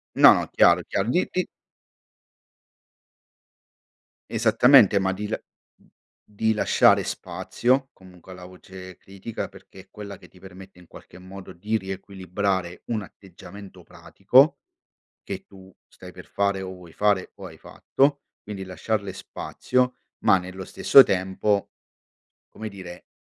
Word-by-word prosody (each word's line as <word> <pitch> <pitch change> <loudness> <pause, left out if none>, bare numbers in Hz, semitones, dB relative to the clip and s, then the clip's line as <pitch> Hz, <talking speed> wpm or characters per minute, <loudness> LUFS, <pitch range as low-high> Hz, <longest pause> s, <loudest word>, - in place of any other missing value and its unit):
No, - - +6
chiaro - - +4
è - - -13
chiaro, 100 - -2
gli 180 +8 +1
i 185 -1 -1 2.8
Esattamente, 115 -1 +5
ma 95 0 0
di 105 +2 -5
la 110 - -4 0.9
di 110 +2 +1
lasciare 105 - +3
spazio 130 +2 -2
comunque 95 -1 -17
alla 90 -1 -11
voce 95 0 -12
critica, 100 +5 -8
perché - - -17
è 95 - -23
quella 100 -2 -9
che - - -18
ti 90 - -20
permette 95 0 -14
in 90 - -18
qualche 90 - -15
modo 95 +1 -11
di 105 +6 -3
riequilibrare 95 -2 -4
un 110 -2 -3
atteggiamento 100 +1 -13
pratico - - +2 0.6
che - - -7
tu 95 -1 -16 0.2
stai - - -14
per - - -12
fare 100 -1 -1
o 95 0 -6
vuoi 90 -3 -14
fare 105 -3 0
o 95 - -10
hai 80 - -14
fatto, 140 - -1 0.2
quindi 100 -2 -7
lasciarle 100 +2 -3
spazio 125 +6 -2 0.2
ma 95 - +4
nello 95 +1 -8
stesso 135 +8 +6
tempo, 95 +1 -1 0.8
come 110 0 -8
dire, 90 -3 -11
95 Hz, 130 wpm, -24 LUFS, 95-105 Hz, 2.8 s, No